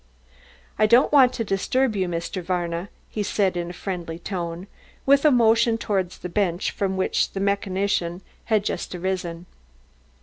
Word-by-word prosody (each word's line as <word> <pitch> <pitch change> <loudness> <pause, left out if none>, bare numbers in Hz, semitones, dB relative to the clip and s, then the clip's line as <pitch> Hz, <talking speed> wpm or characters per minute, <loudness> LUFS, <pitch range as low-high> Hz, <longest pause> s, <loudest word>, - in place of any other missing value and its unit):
"I 215 - +5
don't 240 +5 +5
want 265 -4 +6
to 230 - -2
disturb 220 +4 0
you, 190 -2 0
Mr. 170 +2 -3
Varna," 175 +1 -2 0.2
he 215 - -4
said 200 -2 +1
in 175 0 -3
a - - -7
friendly 175 -3 -5
tone, 175 -1 -5 0.4
with 280 +2 +4
a - - +8
motion 230 -1 +4
towards 190 -5 -2
the - - -6
bench 180 -1 0
from 190 -1 -2
which 190 - 0
the 195 - -3
mechanician 195 -2 -1 0.2
had 215 -3 +2
just 185 - -3
arisen. 180 -2 -3
190 Hz, 160 wpm, -24 LUFS, 175-215 Hz, 0.4 s, a